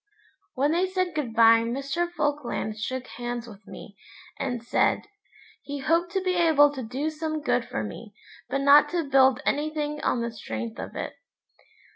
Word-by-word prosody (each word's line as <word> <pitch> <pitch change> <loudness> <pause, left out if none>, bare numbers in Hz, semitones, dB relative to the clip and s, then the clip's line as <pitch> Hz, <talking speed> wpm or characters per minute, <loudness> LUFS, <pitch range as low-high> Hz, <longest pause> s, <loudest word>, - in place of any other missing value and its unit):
When 280 +3 +2
they 350 +3 +2
said 370 -2 -1
good 270 -7 -3
bye 230 0 +7
Mr. 275 +9 -2
Falkland 290 -9 -2
shook 255 +3 -3
hands 240 0 -5
with 210 -2 -14
me, - - -11 0.4
and 245 -4 -3
said 235 - +1 0.6
'he 285 +1 -6
hoped 335 +5 +1
to 385 -1 0
be 370 -1 +1
able 320 -5 +5
to 265 - -5
do 260 +7 -3
some 310 0 -3
good 250 -5 0
for 110 - -4
me, 205 - -9 0.3
but 275 +2 -1
not 280 +1 +6
to 340 -4 -2
build 265 0 +4
anything 300 0 -1
on 240 - 0
the 235 - -3
strength 115 - -6
of - - -7
it.' - - -4
275 Hz, 170 wpm, -26 LUFS, 235-310 Hz, 0.6 s, bye